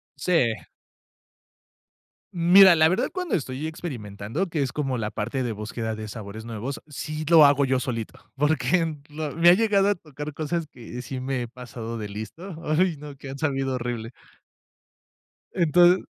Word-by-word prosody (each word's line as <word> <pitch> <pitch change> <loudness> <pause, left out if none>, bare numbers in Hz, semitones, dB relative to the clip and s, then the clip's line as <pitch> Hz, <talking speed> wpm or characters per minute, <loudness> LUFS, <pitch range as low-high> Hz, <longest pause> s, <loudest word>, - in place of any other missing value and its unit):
Sí. 165 -11 +2 1.8
Mira, 180 +1 +7
la 160 0 +6
verdad, 185 - +1
cuando 365 -3 -1
estoy 135 0 -3
experimentando, 125 - -4
que 160 -3 -2
es 130 -3 -1
como 135 -4 -2
la 105 -1 -3
parte 120 +5 -2
de 120 - -2
búsqueda 110 +1 -4
de 110 0 -6
sabores 110 0 -8
nuevos, 115 +4 -5
sí 155 +1 -5
lo 165 -3 +8
hago 140 -1 +4
yo 130 -1 +1
solito, 115 -4 -5
porque 155 +3 +1
lo 150 -1 -4
me 170 +1 +6
ha 175 - +9
llegado 205 -1 +3
a 205 - +2
tocar 150 -2 -8
cosas 160 +2 -2
que 125 0 -8
sí 130 +2 -6
me 130 -1 -2
he 120 - -4
pasado 115 -2 -7
de 105 -2 -5
listo, 110 - -8
ay, 165 +2 +2
no, 145 -1 -10
que 135 - -9
han 135 - -6
sabido 135 -3 -1
horrible. 120 -2 -4 1.4
Entonces. 175 +2 +4
140 Hz, 165 wpm, -25 LUFS, 120-165 Hz, 1.8 s, ha